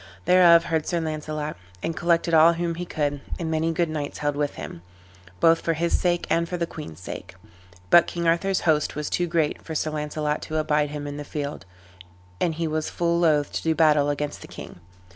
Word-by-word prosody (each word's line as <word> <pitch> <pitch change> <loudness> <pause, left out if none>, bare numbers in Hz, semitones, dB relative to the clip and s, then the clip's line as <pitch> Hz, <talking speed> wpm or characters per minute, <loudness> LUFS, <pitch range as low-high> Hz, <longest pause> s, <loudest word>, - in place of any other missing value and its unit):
Thereof 175 -2 +7
heard 160 -2 -1
Sir 170 - 0
Launcelot, 155 -1 -4 0.3
and 165 - -2
collected 170 0 +1
all 165 +1 +7
whom 170 0 -2
he 175 +1 -6
could; 145 -3 -2 0.2
and 165 -2 -3
many 160 +1 +1
good 170 +1 +1
knights 150 -2 -4
held 145 -1 -1
with 145 0 -1
him, 80 +2 -8 0.6
both 165 - +4
for 165 - 0
his 170 +2 0
sake 175 -1 +1
and 170 0 +1
for 180 - -2
the 170 - 0
queen's 150 - -9
sake. 90 - -8 0.6
But 170 - +7
King 170 -1 -2
Arthur's 185 +3 +2
host 155 -3 +1
was 150 0 -4
too 175 - 0
great 165 -3 0
for 160 - -7
Sir 155 +1 -1
Launcelot 150 0 -2
to 155 - -4
abide 150 -1 +1
him 145 0 -5
in 145 0 -5
the 145 - -5
field; 145 -8 -5 0.7
and 165 -3 0
he 165 0 -1
was 155 0 -2
full 170 0 0
loath 150 -4 +2
to - - -3
do 160 -1 +1
battle 150 -2 +4
against 145 0 -3
the - - -10
king. - - -10
155 Hz, 210 wpm, -24 LUFS, 150-170 Hz, 0.7 s, Thereof